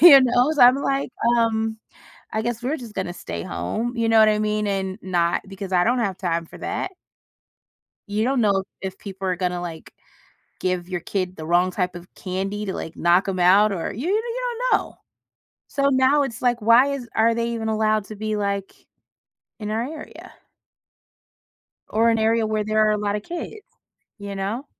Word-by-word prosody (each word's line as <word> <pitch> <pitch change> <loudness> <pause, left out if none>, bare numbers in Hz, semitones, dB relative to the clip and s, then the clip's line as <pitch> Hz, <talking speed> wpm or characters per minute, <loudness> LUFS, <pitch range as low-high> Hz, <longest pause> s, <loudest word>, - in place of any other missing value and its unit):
Who 300 -6 +10
knows? 255 +4 +2
I'm 250 +1 +8
like, 275 -1 -1 0.3
um, 225 -1 +1 0.5
"I 220 - -1
guess 240 +1 -3
we're 280 +6 -1
just 235 -6 -10
gonna 180 -2 -3
stay 85 - -6
home," 230 - -3
you 230 -1 0
know 225 - +5
what 215 0 +7
I 210 0 +1
mean? 210 0 0
And 190 -1 -2
not 175 -2 +1
because 195 0 -7
I 175 - +4
don't 245 +4 +2
have 195 -5 -1
time 170 -3 -1
for - - -13
that. 375 - -3 1.2
You 210 +2 0
don't 260 0 +1
know 200 -3 +2 0.2
if 190 0 -6
people 195 -1 -7
are 180 - 0
gonna, 180 -1 -1
like, 165 -2 -8 0.7
give 180 -1 -1
your 180 -1 -3
kid 185 0 -3
the 155 - -7
wrong 175 +2 +3
type 180 -1 -2
of 175 +1 -11
candy 195 +3 -3
to, 190 - -3
like, 160 - -6
knock 175 +3 +3
'em 190 -1 -2
out 195 +4 +5
or 175 -4 -3
you 255 - -4
you 460 +5 -1 0.3
don't - - +6
know. - - -10 0.7
So 275 0 +1
now 260 +2 +4
it's 250 -4 -4
like, 245 -1 +2
why 235 +4 +6
is 260 -4 -5
are 230 +1 +3
they 235 0 -1
even 225 -1 -3
allowed 215 -1 +1
to 215 - -9
be, 215 +1 -2
like, 200 -1 -2 0.9
in 210 0 -4
our 225 +2 0
area? 300 +4 -9 1.6
Or 230 +2 +3
an 225 - +2
area 225 0 +2
where 215 0 0
there 215 0 +2
are 215 - +3
a 210 - 0
lot 205 0 -1
of 210 - -5
kids? 350 - -7 0.5
Ya 200 -1 -6
know? 205 +8 -3
215 Hz, 195 wpm, -23 LUFS, 190-235 Hz, 1.6 s, Who